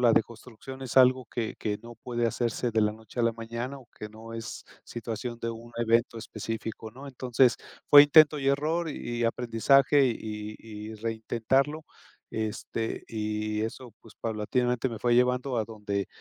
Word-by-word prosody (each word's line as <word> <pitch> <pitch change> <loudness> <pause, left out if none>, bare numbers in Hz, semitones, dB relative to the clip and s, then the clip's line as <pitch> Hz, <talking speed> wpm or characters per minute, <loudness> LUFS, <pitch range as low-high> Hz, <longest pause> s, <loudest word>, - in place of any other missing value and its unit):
la 120 -2 +5
deconstrucción 120 +4 -3
es 130 0 -6
algo 130 0 +6
que 115 0 -3
que 105 -1 -2
no 120 0 -10
puede 120 0 -2
hacerse 120 +1 -1
de 110 - +3
la 105 0 +3
noche 110 +2 -7
a - - +2
la 115 - +3
mañana 115 +4 -5
o 125 - -16
que 105 - -7
no 110 +1 -11
es 115 -1 -6 0.2
situación 120 0 -5
de 115 - -2
un 115 +1 -9
evento 115 0 +2
específico, 110 0 -6
¿no? 135 +4 -11
Entonces, 125 -2 +2 0.3
fue 145 0 +11
intento 150 0 +6
y 135 - +1
error 155 +5 +1
y 120 -3 -4
aprendizaje 125 +4 +4
y 110 -3 -3
y 110 0 -8
reintentarlo, 115 +7 0 0.5
este, 110 +1 -3
y 105 -1 -2
eso, 115 +2 -5
pues 115 - -16
paulatinamente 120 +3 -1
me 115 -3 -7
fue 120 0 +3
llevando 125 +1 +2
a 110 - +1
donde 105 -3 -3
115 Hz, 165 wpm, -28 LUFS, 110-125 Hz, 0.5 s, fue